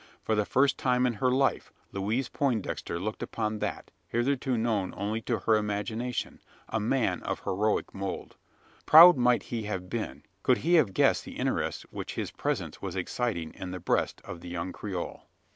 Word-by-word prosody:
For 110 Hz, -, 0 dB
the 105 Hz, -1 st, +2 dB
first 135 Hz, +1 st, +3 dB
time 125 Hz, -1 st, +2 dB
in 125 Hz, -, +1 dB
her 130 Hz, -, +4 dB
life, 135 Hz, +1 st, +1 dB, 0.2 s
Louise 110 Hz, +7 st, -1 dB
Poindexter 120 Hz, -11 st, -1 dB
looked 105 Hz, +4 st, -4 dB
upon 110 Hz, -1 st, -2 dB
that -, -, -4 dB, 0.2 s
hitherto 130 Hz, +1 st, 0 dB
known 110 Hz, -5 st, 0 dB
only 105 Hz, +3 st, -2 dB
to 115 Hz, +1 st, -1 dB
her 110 Hz, +3 st, +4 dB
imagination 105 Hz, +4 st, -3 dB, 0.3 s
a 110 Hz, -, -1 dB
man 120 Hz, +3 st, +1 dB
of -, -, -3 dB
heroic 105 Hz, +3 st, 0 dB
mould. 95 Hz, -1 st, -5 dB, 0.5 s
Proud 170 Hz, +4 st, +10 dB
might 125 Hz, -2 st, +3 dB
he 115 Hz, -2 st, -4 dB
have 95 Hz, -3 st, -4 dB
been, 115 Hz, -2 st, -4 dB, 0.2 s
could -, -, +3 dB
he 170 Hz, -, +3 dB
have 130 Hz, -, +4 dB
guessed -, -, +3 dB
the -, -, -9 dB
interest -, -, -1 dB
which -, -, -6 dB
his -, -, -3 dB
presence -, -, -3 dB
was -, -, -4 dB
exciting 100 Hz, -10 st, -2 dB
in 95 Hz, -, -7 dB
the 90 Hz, 0 st, -5 dB
breast 90 Hz, -, 0 dB
of 85 Hz, -, -8 dB
the 90 Hz, -, -8 dB
young 90 Hz, +1 st, -3 dB
Creole. 95 Hz, -4 st, -5 dB
110 Hz, 175 wpm, -29 LUFS, 100-125 Hz, 0.5 s, Proud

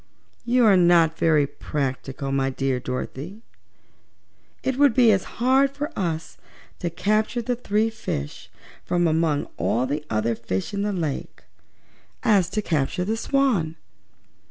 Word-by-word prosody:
"You 245 Hz, 0 st, +3 dB
are 205 Hz, -3 st, +6 dB
not 170 Hz, -3 st, +4 dB
very 155 Hz, -3 st, +4 dB
practical, 135 Hz, -1 st, -4 dB
Dorothy 135 Hz, -1 st, +1 dB, 0.8 s
dear. 205 Hz, +3 st, -14 dB, 1.2 s
It 265 Hz, 0 st, -1 dB
would 285 Hz, -5 st, +5 dB
be 240 Hz, -3 st, +6 dB
as 195 Hz, -2 st, +2 dB
hard 265 Hz, +3 st, +4 dB
for 290 Hz, +3 st, -5 dB
us 165 Hz, -4 st, -3 dB, 0.4 s
to 175 Hz, -, -2 dB
capture 215 Hz, +7 st, 0 dB
the 245 Hz, +2 st, -1 dB
three 220 Hz, -1 st, 0 dB
fishes, 75 Hz, -, -5 dB, 0.3 s
from 175 Hz, -1 st, +1 dB
among 160 Hz, -2 st, +1 dB
all 120 Hz, +3 st, +1 dB
the 145 Hz, +3 st, -3 dB
other 110 Hz, +2 st, 0 dB
fishes 110 Hz, -, -4 dB
in 200 Hz, -, -1 dB
the 205 Hz, +1 st, 0 dB
lake, 160 Hz, -7 st, -4 dB, 0.8 s
as 190 Hz, -5 st, +3 dB
to 210 Hz, +2 st, -2 dB
capture 160 Hz, +2 st, -1 dB
the 220 Hz, +3 st, 0 dB
Swan." 225 Hz, -, +1 dB
180 Hz, 135 wpm, -24 LUFS, 150-225 Hz, 1.2 s, are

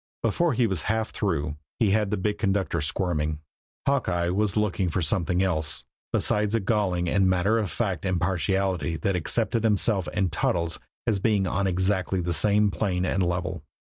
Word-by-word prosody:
Before 150 Hz, +8 st, +2 dB
he 120 Hz, 0 st, +2 dB
was 95 Hz, -7 st, 0 dB
half 110 Hz, 0 st, 0 dB
through 75 Hz, -7 st, -2 dB, 0.2 s
he 110 Hz, -4 st, +2 dB
had 105 Hz, -1 st, +2 dB
the 105 Hz, -, -1 dB
big 105 Hz, +2 st, -1 dB
conductor 95 Hz, -5 st, 0 dB
squirming. 75 Hz, -1 st, -1 dB, 0.5 s
Hawkeye 90 Hz, -11 st, +1 dB
was 105 Hz, +3 st, 0 dB
looking 100 Hz, -3 st, +1 dB
for 85 Hz, -, -1 dB
something 90 Hz, +2 st, +1 dB
else 80 Hz, -4 st, -1 dB, 0.3 s
besides 105 Hz, +1 st, +1 dB
a -, -, +3 dB
galling 95 Hz, -4 st, 0 dB
and 95 Hz, +1 st, +3 dB
matter 95 Hz, +5 st, +2 dB
of 105 Hz, -4 st, -2 dB
fact 95 Hz, -4 st, -2 dB
impartiality 90 Hz, -1 st, 0 dB
that 95 Hz, +5 st, 0 dB
accepted 115 Hz, +6 st, +1 dB
himself 105 Hz, -5 st, +2 dB
and 95 Hz, -3 st, 0 dB
Toddles 85 Hz, -1 st, 0 dB, 0.3 s
as 110 Hz, -4 st, +1 dB
being 105 Hz, -1 st, +2 dB
on 95 Hz, +2 st, 0 dB
exactly 95 Hz, +1 st, 0 dB
the 85 Hz, 0 st, -1 dB
same 105 Hz, +4 st, +3 dB
plane 95 Hz, -3 st, -1 dB
and 95 Hz, +1 st, 0 dB
level. 90 Hz, -1 st, -1 dB
95 Hz, 170 wpm, -26 LUFS, 90-105 Hz, 0.5 s, a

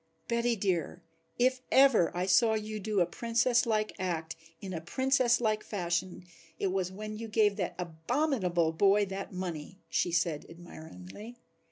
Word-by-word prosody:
"Betty 235 Hz, 0 st, +1 dB
dear, 180 Hz, -3 st, -2 dB, 0.3 s
if 255 Hz, +1 st, +2 dB
ever 265 Hz, -11 st, +6 dB
I 180 Hz, -, 0 dB
saw 220 Hz, +4 st, +4 dB
you 215 Hz, 0 st, -4 dB
do 205 Hz, -1 st, 0 dB
a -, -, +4 dB
Princess 235 Hz, +6 st, +1 dB
like 215 Hz, -1 st, 0 dB
act 165 Hz, -3 st, -3 dB, 0.2 s
in 190 Hz, -2 st, -6 dB
a 165 Hz, -, -4 dB
Princess 255 Hz, +5 st, +2 dB
like 215 Hz, -2 st, 0 dB
fashion 175 Hz, -2 st, -2 dB, 0.3 s
it 190 Hz, -, -1 dB
was 185 Hz, -1 st, -1 dB
when 215 Hz, +2 st, -6 dB
you 230 Hz, -, -5 dB
gave 210 Hz, -2 st, +2 dB
that 180 Hz, -3 st, -2 dB
abominable 180 Hz, -, 0 dB
boy 200 Hz, +5 st, +3 dB
that 195 Hz, 0 st, -6 dB
money," 180 Hz, -2 st, -5 dB
she 175 Hz, -, 0 dB
said 165 Hz, -3 st, 0 dB
admiringly. 165 Hz, -, -11 dB
195 Hz, 155 wpm, -30 LUFS, 175-230 Hz, 0.3 s, ever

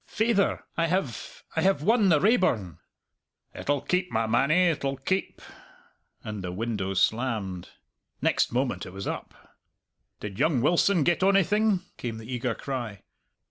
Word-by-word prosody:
"Faither, 220 Hz, -3 st, +1 dB
I 165 Hz, 0 st, +2 dB
have 165 Hz, -, -3 dB
I -, -, +1 dB
have 190 Hz, -6 st, +2 dB
won 215 Hz, +1 st, +4 dB
the 155 Hz, -4 st, +5 dB
Raeburn!" 145 Hz, -, +1 dB, 0.7 s
"It'll 145 Hz, -1 st, -1 dB
keep, 180 Hz, +3 st, 0 dB
my 115 Hz, 0 st, +1 dB
mannie, 140 Hz, +11 st, +3 dB
it'll 140 Hz, -4 st, -2 dB
keep" 185 Hz, +8 st, -2 dB, 0.8 s
and 105 Hz, -3 st, -6 dB
the 90 Hz, -, -4 dB
window 100 Hz, -1 st, -3 dB
slammed. 105 Hz, -4 st, 0 dB, 0.5 s
Next -, -, +1 dB
moment 125 Hz, -7 st, -1 dB
it 90 Hz, -, -10 dB
was 95 Hz, 0 st, -6 dB
up. -, -, -5 dB, 0.8 s
"Did 100 Hz, -1 st, -7 dB
young 150 Hz, -2 st, +3 dB
Wilson 175 Hz, +5 st, +3 dB
get 175 Hz, +4 st, +1 dB
onything?" 195 Hz, +1 st, +3 dB, 0.2 s
came 115 Hz, -2 st, -4 dB
the 110 Hz, +3 st, -7 dB
eager 120 Hz, -1 st, -1 dB
cry. 120 Hz, -7 st, -5 dB
135 Hz, 140 wpm, -27 LUFS, 110-185 Hz, 0.8 s, the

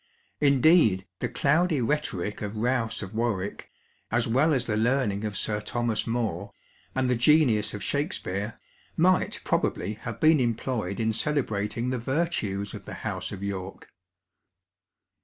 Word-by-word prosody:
Indeed, 140 Hz, -, +4 dB
the -, -, -2 dB
cloudy 155 Hz, +2 st, +2 dB
rhetoric 115 Hz, -7 st, -1 dB
of 105 Hz, +1 st, -4 dB
Rous 115 Hz, -1 st, 0 dB
of 95 Hz, -, -8 dB
Warwick, 110 Hz, -4 st, -2 dB, 0.4 s
as 120 Hz, +2 st, +1 dB
well 135 Hz, +8 st, +3 dB
as 130 Hz, -4 st, +1 dB
the 110 Hz, -, -1 dB
learning 110 Hz, -2 st, +1 dB
of 105 Hz, -2 st, -3 dB
Sir 105 Hz, -1 st, 0 dB
Thomas 120 Hz, +1 st, -1 dB
More, 115 Hz, -2 st, -2 dB, 0.4 s
and 130 Hz, -1 st, +1 dB
the 125 Hz, -, +2 dB
genius 120 Hz, -5 st, +3 dB
of 100 Hz, -, -6 dB
Shakspeare, 110 Hz, -, -2 dB, 0.4 s
might 180 Hz, +3 st, +3 dB
probably 100 Hz, +5 st, 0 dB
have 115 Hz, -2 st, -6 dB
been 155 Hz, -1 st, +5 dB
employed 115 Hz, -4 st, -1 dB
in 110 Hz, 0 st, +1 dB
celebrating 115 Hz, -3 st, -1 dB
the 130 Hz, -, -1 dB
virtues 115 Hz, -, -1 dB
of -, -, -9 dB
the -, -, -7 dB
House -, -, -2 dB
of 100 Hz, 0 st, -7 dB
York. 95 Hz, -1 st, -5 dB
115 Hz, 140 wpm, -27 LUFS, 105-135 Hz, 0.4 s, been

